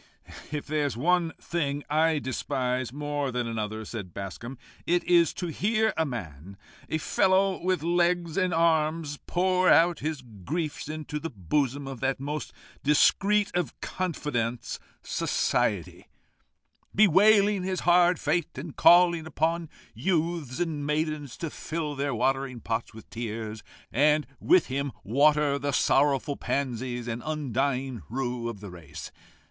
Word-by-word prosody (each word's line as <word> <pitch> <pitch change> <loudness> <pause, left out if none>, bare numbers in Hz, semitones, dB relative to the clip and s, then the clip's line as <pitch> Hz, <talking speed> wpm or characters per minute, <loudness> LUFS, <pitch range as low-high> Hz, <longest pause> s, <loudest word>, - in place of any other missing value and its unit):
"If 150 -1 -3
there 150 -1 0
is 130 - -5
one 170 +4 +2
thing 145 -4 -2
I 160 +1 +2
despise 130 -2 -2
more 145 -1 -2
than 125 0 -1
another," 110 -1 -4
said 100 -6 -7
Bascombe, 100 +6 -6 0.3
"it 175 +1 +2
is 170 -2 +4
to 175 - -3
hear 220 +5 +1
a 160 - +1
man, 95 - -7 0.3
a 160 - 0
fellow 190 +3 +2
with 185 -4 0
legs 175 -1 +1
and 185 -2 +1
arms, 160 -2 +1
pour 185 0 +2
out 170 -1 +5
his 150 -3 -3 0.2
griefs 155 - -3
into 155 -1 -4
the 165 +2 -4
bosom 135 - -1
of 135 -3 -6
that 135 +1 0
most 150 +3 -4 0.3
discreet 200 +8 +3
of 175 -8 -2
confidantes, 125 - -3 0.2
Society, - - -1 0.9
bewailing 205 +1 +5
his 185 0 -2
hard 175 0 +4
fate, 175 -6 -1
and 145 +2 -7
calling 170 -2 +5
upon 160 +1 -1 0.2
youths 165 -6 -1
and 160 -4 -2
maidens 150 -2 -2
to 165 -3 -4
fill 155 -2 -4
their 140 -2 -2
watering 135 +1 0
pots 115 +1 -3
with 110 0 -13
tears, 110 -2 -5 0.3
and 150 +4 +3
with 185 - +4
him 140 0 -3
water 145 +4 +3
the 145 +1 -1
sorrowful 140 +1 +2
pansies 125 -2 -2
and 120 0 -3
undying 135 -4 -1
rue 120 -1 -2
of 105 -4 -8
the 100 -3 -8
race. 80 -4 -9
145 Hz, 140 wpm, -27 LUFS, 125-170 Hz, 0.9 s, out